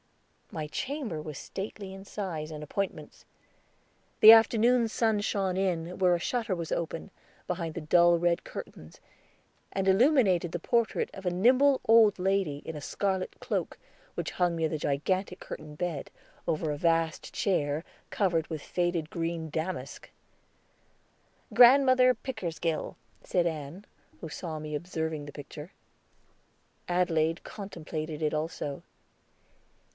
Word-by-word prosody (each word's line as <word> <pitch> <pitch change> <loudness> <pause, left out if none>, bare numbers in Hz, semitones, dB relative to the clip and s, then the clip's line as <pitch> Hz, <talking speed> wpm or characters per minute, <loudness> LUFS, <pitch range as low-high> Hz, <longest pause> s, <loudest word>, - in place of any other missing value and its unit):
My 155 - -4
chamber 250 - -4
was 150 -2 -7
stately 195 +4 -6
in 195 0 -10
size 180 -7 -5
and 150 -1 -7
appointments. 195 +6 -4 1.0
The 220 +1 +11
afternoon 230 +1 +4
sun 220 -2 +1
shone 195 -3 -1
in, 180 -2 -1
where 180 -2 +4
a - - -2
shutter 225 0 -1
was 170 -2 -5
open, 165 +3 -4 0.4
behind 170 -3 -3
the 170 - -4
dull 170 +2 +5
red 170 0 +1
curtains, 80 +1 -9 0.7
and 195 0 -1
illuminated 195 - +4
the 175 - -3
portrait 235 +5 0
of 190 - -10
a - - +3
nimble 255 +9 +4
old 225 -2 +6
lady 190 -5 0
in 160 - -5
a 150 - -6
scarlet 190 +4 -2
cloak, - - -3 0.4
which - - -3
hung 175 -2 0
near 160 -1 +1
the 155 -1 -3
gigantic 180 +7 -1
curtained 150 -1 -9
bed, 170 -5 -3 0.4
over 160 -2 0
a 145 - -3
vast 165 0 0
chair, 155 -5 0 0.2
covered 175 -6 +1
with 160 -3 -5
faded 175 -3 -1
green 165 -1 -3
damask. 160 -4 -4 1.4
"Grandmother 255 0 +7
Pickersgill," 170 -10 -3 0.3
said 175 -2 +1
Ann, 160 +4 -4 0.3
who 165 - -6
saw 160 0 -5
me 150 0 -6
observing 160 -2 -3
the - - -7
picture. 150 +4 -9 1.2
Adelaide 165 -2 +1
contemplated 160 -6 -6
it 150 - +1
also. 155 -2 -3
175 Hz, 130 wpm, -29 LUFS, 155-195 Hz, 1.4 s, The